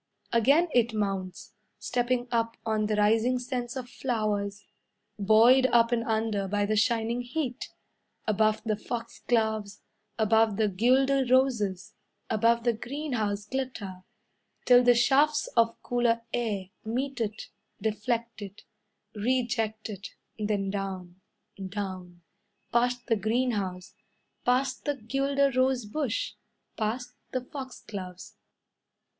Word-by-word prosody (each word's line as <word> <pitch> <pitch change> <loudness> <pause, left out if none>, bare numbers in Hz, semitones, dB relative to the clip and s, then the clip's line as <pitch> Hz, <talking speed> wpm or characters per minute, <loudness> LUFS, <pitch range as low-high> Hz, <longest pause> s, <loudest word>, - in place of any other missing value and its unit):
Again 275 +9 +4
it 235 -2 +3
mounts, 195 -3 -3 0.2
Stepping 245 +3 -1
up 230 -1 0
on 215 -1 +1
the 215 - 0
rising 225 +4 +3
scents 245 -1 -4
of 255 -2 -5
flowers, 210 -5 -2 0.5
Buoyed 230 +6 +6
up 235 -1 +4
and 235 -1 +1
under 220 -3 0
by 205 +1 0
the 215 +1 0
shining 230 +2 +1
heat. 250 +1 -4 0.6
Above 215 0 +2
the 220 -1 0
foxgloves, 220 -2 -2 0.3
Above 220 -1 +3
the 215 -2 +2
guelder 265 +7 +3
roses, 215 -6 +2 0.4
Above 230 +2 +3
the 240 -1 +2
greenhouse 230 -5 -3
glitter, 210 -7 -4 0.6
Till 245 -1 +7
the 245 -1 +5
shafts 285 +5 +3
of 230 -1 +3
cooler 235 -1 +1
air 205 -6 -2
Meet 255 +3 -2
it, 215 -1 -3 0.3
Deflect 230 +2 -2
it, 200 0 -9 0.5
Reject 225 -1 -1
it, 200 -3 -8 0.2
Then 205 -2 -1
down, 190 -2 -5 0.4
Down, 185 -3 -6 0.5
Past 245 +1 +1
the 230 - +2
greenhouse, 205 -4 -1 0.5
Past 255 +1 +1
the 290 -1 0
guelder 275 +3 +1
rose 255 -2 +2
bush, 310 - -2 0.4
Past 240 +3 -2 0.2
the 255 - 0
foxgloves. 210 -9 -8
230 Hz, 115 wpm, -28 LUFS, 210-250 Hz, 0.6 s, Till